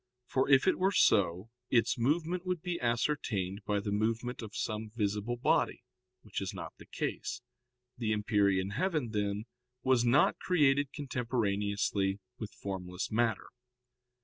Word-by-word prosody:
For 130 +2 0
if 135 +4 +5
it 185 - +3
were 190 +1 +3
so, 95 - +3 0.2
its 115 -3 +3
movement 165 +8 0
would 180 -3 -2
be 175 -2 -3
ascertained 115 -6 0
by 105 -1 +1
the 100 0 -3
movement 115 +4 -1
of 110 -2 -8
some 110 0 -3
visible 105 +2 -1
body, 120 - +1 0.4
which - - -4
is - - -4
not - - -6
the - - -13
case. - - -4 0.6
The 110 -3 0
empyrean 100 -3 +2
heaven, 155 - -1
then, 105 -1 -1 0.4
was 130 -2 +4
not 125 +5 +4
created 145 -5 +3
contemporaneously 105 -7 -1 0.2
with 110 - -4
formless 90 -2 -5
matter. 115 -2 +1
115 Hz, 140 wpm, -32 LUFS, 100-135 Hz, 0.6 s, if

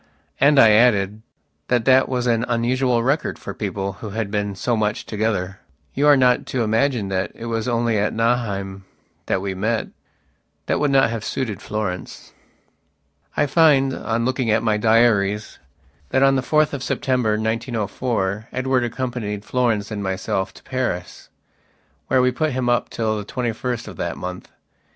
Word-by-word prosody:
And 145 +1 +5
I 110 -3 +8
added, 105 -2 +3 0.5
that 120 -2 +1
that 130 0 +5
was 125 -2 -1
an 115 -1 +2
unusual 120 0 +1
record 140 +5 0
for - - -7
people 100 -1 -3
who 110 - -5
had 105 0 -3
been 105 -1 -2
so 120 +6 0
much 105 -1 -1
together. 100 -4 -2 0.3
You 145 +2 +2
are 145 -1 +7
not 125 -1 +3
to 125 -3 -1
imagine 115 -1 +1
that 95 0 -1
it 115 - -8
was 115 0 -2
only 115 -2 +1
at 105 - +1
Nauheim 100 -5 -1 0.4
that 95 - 0
we 95 -1 -2
met. 110 +4 -1 0.8
That - - 0
would 150 - +2
not 135 -4 +4
have 115 -2 -4
suited 115 -4 -3
Florence. 105 -4 -5 1.0
I 145 - +3
find, 140 -3 +4
on 115 0 -2
looking 130 -2 0
at 110 +1 +2
my 110 -2 +2
diaries, 105 -2 +2 0.5
that 130 - +2
on 135 0 +5
the 130 - +1
4th 155 +3 +2
of 140 - -4
September, 125 -5 0
1904, 110 -1 -2
Edward 130 0 0
accompanied 120 -4 -4
Florence 115 -5 0
and 105 -1 -3
myself 95 0 -2
to - - -15
Paris, 120 -9 -4 0.8
where 130 -1 +3
we 125 - +3
put 155 +3 -1
him 125 -1 -1
up 120 - +1
till 110 -2 -1
the - - -5
twenty 120 +2 -2
first 120 +1 -4
of - - -9
that - - -3
month. 90 0 -7
115 Hz, 170 wpm, -21 LUFS, 105-125 Hz, 1.0 s, I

